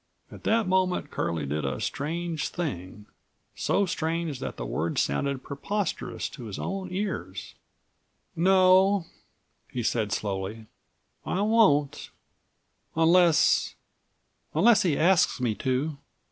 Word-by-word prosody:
At - - -12
that 225 -2 +2
moment 185 -1 +1
Curlie 80 -3 -2
did 75 +2 -2
a 70 -2 -2
strange 165 +2 -3
thing, 105 - -5 0.5
so 200 - +1
strange 165 -4 -2
that - - -5
the - - -4
words - - -2
sounded 130 - -1
preposterous 185 +6 -3
to 125 -5 -10
his 105 -3 -6
own 195 -1 -4
ears:169 155 - -5 0.8
"No," 190 0 +5 0.7
he 125 - -3
said 110 -2 0
slowly, 105 0 -3 0.6
"I 190 - -1
won't, 150 -11 +3 0.9
unless—unless 170 +6 +2
he 165 -6 +1
asks 175 -3 +3
me 120 -3 0
to." 135 +6 -2
155 Hz, 110 wpm, -27 LUFS, 110-185 Hz, 0.9 s, No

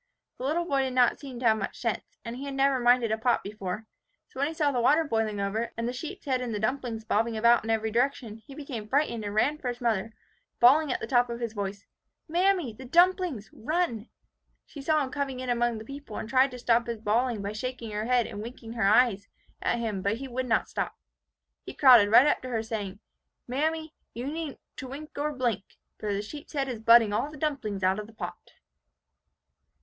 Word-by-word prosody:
The 255 - -4
little 330 +5 0
boy 275 -5 +1
did 260 -1 -2
not 245 -2 +4
seem 265 -4 -8
to - - -3
have 220 -1 +4
much 195 - -4
sense; 230 -3 -3
and 230 +1 -5
had 275 +1 -5
never 270 -1 +3
minded 240 -2 +4
a 220 - 0
pot 240 +1 +2
before; 205 +1 -5 0.4
so 260 - -10
when 280 - +2
he 320 - -4
saw 300 -3 +2
the 250 -3 0
water 300 +7 +4
boiling 225 -7 -1
over, 220 +4 -1
and 230 0 -1
the 245 - -2
sheep's 320 +10 -7
head 260 -3 0
and 235 -3 -3
the - - -2
dumplings 225 -1 -2
bobbing 225 +1 +1
about 235 +1 +5
in 225 - -6
every 220 0 0
direction, 240 -2 0
he 225 +5 -14
became 260 -8 -6
frightened 260 -3 0
and 205 0 -4
ran 285 +8 +2
for 260 - -5
his 245 0 -3
mother, 225 -3 -1 0.4
bawling 280 +4 +6
at - - -2
the - - -2
top 245 -2 +2
of 235 0 -4
his 230 -2 -3
voice, 200 -1 -4 0.4
'Mammy! 350 - +1
the 260 - -11
dumplings! 340 - +2
run!' 250 -4 -2 0.6
She 285 - -10
saw 305 +1 +2
him 265 - -5
coming 275 -3 -3
in 255 -1 -2
among 240 -1 +1
the 220 - -8
people, 275 -4 -8
and - - -5
tried 260 +3 +4
to 250 - -8
stop 235 -1 +2
his 235 -1 -3
bawling 225 0 0
by 200 - -3
shaking 230 +1 -5
her 210 +1 -2
head 245 -1 +3
and 205 - -6
winking 230 0 -8
her 230 -4 +1
eyes 215 -2 +4 0.3
at - - +1
him; 220 -5 -2
but 200 +3 0
he 270 +2 -6
would 255 0 -3
not 225 -2 +2
stop. - - -3 0.7
He - - -9
crowded 245 -7 +7
right 235 +5 +8
up 295 - +2
to 255 - -6
her, 225 -3 -1
saying, 210 -3 -4 0.5
'Mammy, 315 +5 -1 0.2
you 240 +2 -4
needn't 305 0 -4 0.2
to 260 - -6
wink 290 +4 -8
nor 295 +1 -1
to 300 - -7
blink, 235 -6 0 0.4
for 210 - -2
the 200 0 -1
sheep's 290 +9 -10
head 275 -2 0
is 245 -4 -4
butting 225 -1 +6
all 275 +7 0
the 300 - -11
dumplings 265 -10 -2
out 190 +2 +2
of 210 - -6
the 225 - -16
pot! 220 - -8
240 Hz, 225 wpm, -28 LUFS, 220-275 Hz, 0.7 s, right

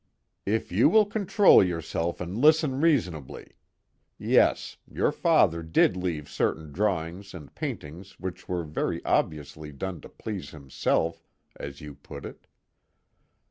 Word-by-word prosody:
"If 110 -1 -1
you 100 +7 +4
will 215 -1 +5
control 205 - +5
yourself 85 -1 -2
and 90 +2 -5
listen 150 +1 +3
reasonably: 90 - 0 0.7
yes, - - +2
your - - +1
father 85 +1 +3
did 80 +2 +2
leave 85 -5 -3
certain 80 -2 -2
drawings 95 +1 -2
and 75 -5 -11
paintings 85 +7 -7
which 95 0 -7
were 90 -2 -1
very 75 -1 -3
obviously 75 0 -1
done 85 +3 -5
to - - -12
please 100 -10 -6
himself, 80 +3 -1 0.3
as 70 0 -8
you 75 -1 -8
put - - -11
it. - - -11
90 Hz, 130 wpm, -27 LUFS, 80-100 Hz, 0.7 s, will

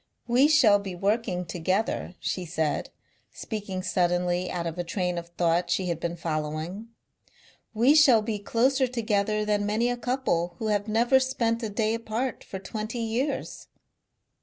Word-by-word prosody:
"We 250 +4 +4
shall 255 -10 +5
be 195 -2 -6
working 195 -1 0
together," 180 +3 -1
she 185 - -2
said, 160 -3 -2 0.4
speaking 200 -4 -5
suddenly 180 0 0
out 175 -1 -3
of 165 +1 -4
a - - 0
train 180 0 -2
of 170 - -10
thought 175 0 +2
she 185 0 0
had 170 -2 -2
been 170 0 -3
following, 160 +5 -4 0.9
"we 240 +6 +5
shall 270 -8 +6
be 215 -1 -2
closer 255 +6 +2
together 215 -3 0
than 210 -1 +1
many 220 +4 +1
a 245 - -2
couple 240 -9 -1
who 220 -3 -2
have 205 0 0
never 235 +5 +4
spent 240 -3 0
a 220 - -3
day 215 +1 0
apart 230 +3 -3
for 190 - -7
twenty 215 +4 -5
years." 235 +5 -2
210 Hz, 160 wpm, -27 LUFS, 180-230 Hz, 0.9 s, shall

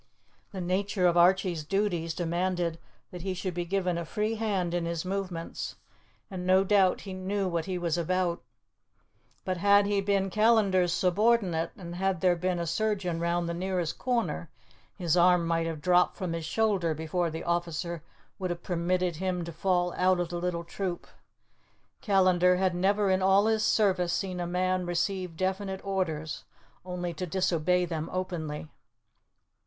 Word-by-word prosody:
The 190 - -5
nature 185 +1 0
of 175 -1 +4
Archie's 180 -2 +3
duties 175 -2 -1
demanded 175 -1 -1 0.3
that 180 - -7
he 185 +1 -3
should 185 0 -3
be 175 0 -3
given 180 -1 0
a - - -3
free 210 +6 -2
hand 200 -6 -1
in 175 -1 -1
his 170 0 -3
movements, 185 -3 -4 0.6
and 185 -2 -5
no 185 +1 +4
doubt 195 -2 +3
he 195 - -7
knew 190 +1 -2
what 170 -2 -1
he 185 -2 -3
was 175 -1 -1
about. 175 0 0 1.0
But 185 -1 -1
had 200 +2 +5
he 200 -1 +1
been 195 -1 0
Callandar's 210 -5 +3
subordinate, 185 -2 +2
and 175 -3 -8
had 190 -1 0
there 180 0 +3
been 180 +1 -1
a 170 - -2
surgeon 190 -1 -1
round 170 0 0
the 170 - -2
nearest 180 -2 -2
corner, 245 -2 -1 0.5
his 175 -4 +1
arm 180 -1 +5
might 165 0 0
have 160 -2 -5
dropped 180 +2 +3
from 185 -4 -3
his 165 -1 -4
shoulder 190 -4 +1
before 165 +3 -1
the 160 +1 -6
officer 170 -1 -2 0.4
would 185 -1 -2
have 175 0 -4
permitted 180 -1 0
him 180 -1 -2
to 170 - -6
fall 175 +1 0
out 185 0 +2
of 175 -1 -1
the 175 0 -4
little 175 -1 -2
troop. 175 +1 -4 1.0
Callandar 185 -3 +4
had 185 0 +1
never 195 +2 +2
in 185 0 +2
all 195 +2 +4
his 220 -1 +2
service 185 -6 +2
seen 185 -2 -2
a 175 - -2
man 185 +1 0
receive 175 0 -2
definite 190 +1 -2
orders 160 -6 -2 0.4
only 180 -1 -4
to 180 +3 -4
disobey 180 0 +1
them 160 -2 -4
openly. 165 -5 -4
180 Hz, 165 wpm, -28 LUFS, 170-190 Hz, 1.0 s, had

